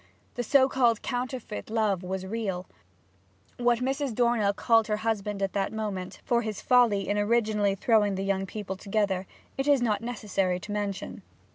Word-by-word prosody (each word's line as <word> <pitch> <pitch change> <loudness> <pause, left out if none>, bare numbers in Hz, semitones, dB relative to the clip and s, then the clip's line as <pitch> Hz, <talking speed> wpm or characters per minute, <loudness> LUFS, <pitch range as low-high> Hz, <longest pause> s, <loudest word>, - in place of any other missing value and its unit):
The 245 - -3
so 265 +3 +4
called 240 -4 +2
counterfeit 250 -4 -4
love 215 -5 +1
was 190 0 -4
real. 190 -3 -3 0.9
What 240 0 +2
Mrs. 270 -2 -1
Dornell 235 -4 +3
called 225 +2 +3
her 210 -1 0
husband 210 -2 -1
at 195 - -1
that 195 -1 -1
moment, 205 -4 -4
for 240 -2 +2
his 215 -3 -4
folly 235 -6 +3
in 205 +1 0
originally 210 -2 +2
throwing 205 -1 +2
the 190 - -2
young 195 -1 0
people 195 -1 -5
together, 195 -1 -1 0.3
it 270 - 0
is 285 -2 +5
not 225 -3 0
necessary 200 -6 -1
to 210 - -7
mention. 205 -2 -4
210 Hz, 165 wpm, -27 LUFS, 195-235 Hz, 0.9 s, is